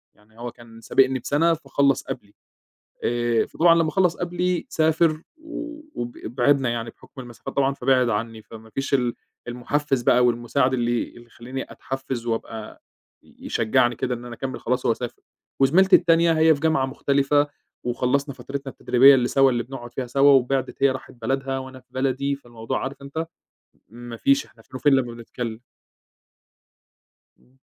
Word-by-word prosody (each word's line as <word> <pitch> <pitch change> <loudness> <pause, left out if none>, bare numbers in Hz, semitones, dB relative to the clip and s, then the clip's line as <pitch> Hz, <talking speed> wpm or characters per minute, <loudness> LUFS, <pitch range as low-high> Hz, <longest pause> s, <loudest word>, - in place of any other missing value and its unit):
يعني 110 +2 -24
هو 120 0 -5
كان 115 -1 -15
سابقني 130 +3 +2
بسنة 165 +6 +2
فخلص 140 -3 +1
قبلي، 100 -5 -7 0.7
آآ 120 -1 +1
فطبعًا 165 0 +4
لما 165 -2 +2
خلص 180 +1 +2
قبلي 175 0 -1
سافر 160 0 +2 0.2
و 310 -1 -7
وب 120 0 -4
بعدنا 130 +2 +2
يعني 115 0 -3
بحكم 135 - -14
المسافات 120 -2 -9
طبعًا، 140 0 +2
فبعد 130 -1 +2
عني، 115 0 -3
فما 110 0 -13
فيش 135 +5 -2
ال 125 -3 +1 0.3
المحفز 135 +2 -1
بقى 125 +1 +4
والمساعد 125 +2 +1
اللي 120 -1 0
اللي 120 0 -15
يخليني 125 +3 -7
أتحفز 130 -3 -5
وأبقى 115 -1 -5 0.4
ي - - -23
يشجعني 120 +1 +2
كده 125 +2 -1
إن 120 0 -9
أنا 120 -1 -7
أكمل، 130 +1 -5
خلاص 125 +1 -1
هو 115 - +3
سافر. 120 +1 -7 0.4
وزميلتي 185 +8 +6
التانية 165 0 +3
هي 160 0 +6
في 140 - -7
جامعة 155 -4 +2
مختلفة 140 +2 +1 0.4
وخلصنا 130 +3 0
فترتنا 135 -1 -6
التدريبية 130 +3 +6
اللي 125 -2 +2
سوا 135 -1 +4
اللي 120 -1 0
بنقعد 120 -1 -9
فيها 130 -1 -3
سوا 140 +3 +4
وبعدِت، 135 0 +1
هي 140 - +6
راحت 130 +1 -7
بلدها 135 0 -1
وأنا 130 0 -9
في 125 - -34
بلدي، 135 +1 -1
فالموضوع 120 -4 -5
عارف 135 +1 -6
أنت 160 +4 -4 0.6
ما 120 +1 -9
فيش، 140 +3 +2
إحنا 115 - -21
فين 130 - -15
وفين 145 +1 +3
لما 125 -3 +1
بنتكلم. 115 -1 -6 1.8
إمم. 130 +1 -29
130 Hz, 160 wpm, -23 LUFS, 120-140 Hz, 1.8 s, وزميلتي